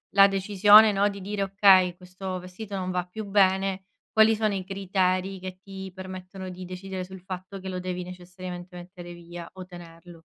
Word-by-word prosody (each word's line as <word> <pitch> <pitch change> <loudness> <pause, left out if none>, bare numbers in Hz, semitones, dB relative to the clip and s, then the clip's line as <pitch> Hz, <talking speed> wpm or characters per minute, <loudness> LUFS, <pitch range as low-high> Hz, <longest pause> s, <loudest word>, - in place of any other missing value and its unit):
la 195 0 +9
decisione, 205 +2 +6
no, 200 +1 +2
di 200 - -7
dire: 200 +1 -4
"Okay, 190 -2 +5
questo 185 +1 -6
vestito 185 +3 -8
non 185 -1 -3
va 180 -1 -1
più 210 +4 -7
bene", 195 -1 +2 0.3
quali 220 0 +5
sono 215 -1 0
i 190 - -3
criteri 190 0 -1
che 185 0 -7
ti 190 -1 -8
permettono 185 0 -8
di 185 0 -8
decidere 185 +1 -6
sul 190 0 -10
fatto 185 +1 -7
che 190 - -8
lo 185 -1 -4
devi 180 0 -4
necessariamente 180 0 -9
mettere 175 0 -10
via 170 0 -10
o 185 -1 -9
tenerlo? 175 -1 -12
185 Hz, 180 wpm, -26 LUFS, 180-195 Hz, 0.3 s, la